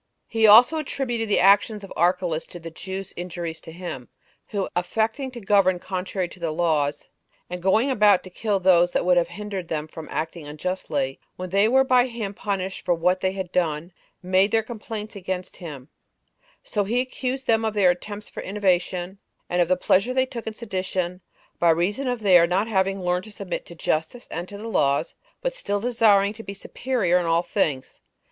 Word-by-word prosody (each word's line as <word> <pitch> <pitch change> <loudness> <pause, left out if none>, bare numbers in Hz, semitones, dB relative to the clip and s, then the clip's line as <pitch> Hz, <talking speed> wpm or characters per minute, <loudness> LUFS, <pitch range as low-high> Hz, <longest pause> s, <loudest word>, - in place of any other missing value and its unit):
He 225 -1 +3
also 245 +9 +8
attributed 240 -6 -2
the 205 - +3
actions 205 +2 +4
of 195 - -9
Archlaus 175 -1 +1
to 175 - -10
the 165 0 -8
Jews' 190 +3 -6
injuries 175 -2 -5
to 165 - -10
him, 170 -7 -7 0.4
who, 200 -2 -2
affecting 220 +9 -1
to 250 -2 -9
govern 195 -3 +3
contrary 185 0 -3
to 180 - -14
the 170 -1 -2
laws, 155 -3 0 0.4
and 180 0 -4
going 220 +9 +3
about 210 -6 +4
to 185 - -11
kill 205 +1 -1
those 175 -1 +4
that - - +1
would 180 0 +4
have 170 -1 +3
hindered 195 0 -6
them 155 -1 -3
from 155 0 -9
acting 160 -1 -4
unjustly, 150 -4 -3 0.2
when 185 -1 -6
they 200 +2 +4
were 265 +3 +5
by 255 -1 +4
him 225 -5 -5
punished 195 -2 -3
for 175 - +2
what 180 +3 +1
they 190 0 0
had 190 -2 -5
done, 170 -1 -1 0.3
made 185 +2 +3
their 225 -1 +2
complaints 215 -1 -7
against 185 -1 -5
him; 145 -7 -8 0.8
so 205 - -1
he 230 +5 0
accused 260 +1 -3
them 225 0 +2
of 220 -1 -1
their 190 -3 +5
attempts 205 +4 -6
for - - -7
innovation, 185 -1 -1 0.3
and 175 0 +2
of 175 - +3
the 185 +1 +2
pleasure 200 +7 +2
they 260 0 +3
took 240 -3 -8
in 220 - -4
sedition, 185 -4 -3 0.4
by 170 - +4
reason 185 +11 +1
of 245 -2 -1
their 180 -4 +6
not 190 +5 +1
having 195 -2 0
learned 180 +1 0
to 215 - -10
submit 200 -2 -5
to 170 - -10
justice 160 +9 -2
and 175 +2 -5
to 205 - -8
the 215 +3 -7
laws, 140 -10 +1 0.3
but - - 0
still 205 - -2
desiring 210 -3 +3
to 220 - -10
be 200 -2 -7
superior 195 -4 0
in 175 - -2
all 165 +1 +2
things. 150 -10 -2
190 Hz, 195 wpm, -24 LUFS, 175-215 Hz, 0.8 s, also